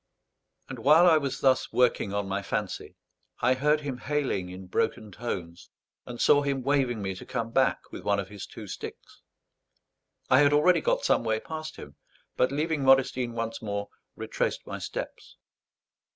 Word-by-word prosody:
And 130 -2 -7
while 150 +8 +6
I 160 -3 +6
was 140 -3 -4
thus 130 -1 +2
working 125 -5 +2
on 100 0 -2
my 100 +1 -2
fancy, 105 0 -4 0.4
I 125 +2 +3
heard 150 +3 +2
him 135 -4 -5
hailing 130 -11 -1
in 95 +1 -9
broken 105 +3 -1
tones, 90 -6 -6 0.4
and 120 -1 -7
saw 145 - +5
him 140 -2 -1
waving 130 -5 +1
me 95 0 -2
to 95 - -10
come 115 0 -4
back 130 +2 +3
with - - -7
one 100 0 +1
of 95 -1 -5
his 105 -2 -8
two - - -10
sticks. - - -9 1.1
I 130 - +5
had 145 0 +5
already 155 +5 +4
got - - 0
some - - +3
way 110 -1 0
past 155 +3 -7
him; 70 0 -11 0.4
but, 130 - +2
leaving 150 0 -1
Modestine 130 -2 +3
once 115 -1 -4
more, 100 -1 -4 0.3
retraced - - -2
my - - -6
steps. - - -7
125 Hz, 170 wpm, -27 LUFS, 100-145 Hz, 1.1 s, while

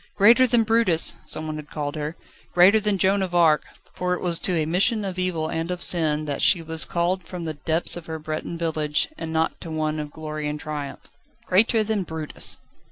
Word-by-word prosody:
"Greater 235 +6 +6
than 235 -1 +3
Brutus!" 225 -7 +3
some 155 0 -2
had 150 -1 -8
called 145 -1 -4
her. 150 +1 -4 0.4
Greater 190 +5 +6
than 210 -1 0
Joan 195 +1 +2
of 180 -2 -3
Arc, 160 -3 +4 0.3
for 180 0 -1
it - - -6
was 175 -2 +2
to 185 - +1
a 155 - +1
mission 200 +6 +1
of 185 -1 -4
evil 175 -4 -1
and 165 +1 -3
of 180 -1 -3
sin 155 -3 +2
that 145 -2 -3
she 185 - +4
was 160 -1 0
called 175 +2 -1
from 175 0 -7
the 160 - -3
depths 160 +3 0
of 175 -2 -9
her 160 -1 -4
Breton 155 +2 -5
village, 155 - 0
and 160 - -6
not 160 0 -1
to 165 - -7
one 155 -1 -2
of 150 -1 -5
glory 155 0 -5
and 150 0 -4
triumph. 150 -2 -6 0.4
"Greater 220 +3 +4
than 215 -1 -1
Brutus!" 160 -3 -5
165 Hz, 210 wpm, -24 LUFS, 155-185 Hz, 0.4 s, Greater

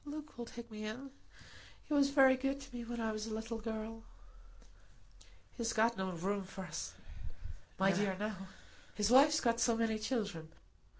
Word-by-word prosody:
Luke 300 +1 -7
will 235 -1 -6
take 235 0 -9
me 215 0 -6
in. 250 +6 -5 0.7
He - - -3
was 280 -1 +5
very 270 -2 +6
good 270 +1 -1
to 270 - -12
me 240 - -4
when 235 0 -5
I 225 -1 0
was 215 0 -4
a 220 - -4
little 225 +1 -4
girl." 225 0 -5 1.5
"He's 230 -2 -1
got 230 +2 +3
no 190 -2 -2
room 195 +4 -1
for 190 0 -7
us, 155 -4 -5 0.8
my 195 +1 +4
dear, 190 0 +1
now; 205 -2 -3 0.5
his 210 +1 +1
wife's 295 +4 +7
got 235 -1 +2
so 235 -1 +3
many 225 -1 +1
children. 205 -9 -2
225 Hz, 175 wpm, -35 LUFS, 210-250 Hz, 1.5 s, wife's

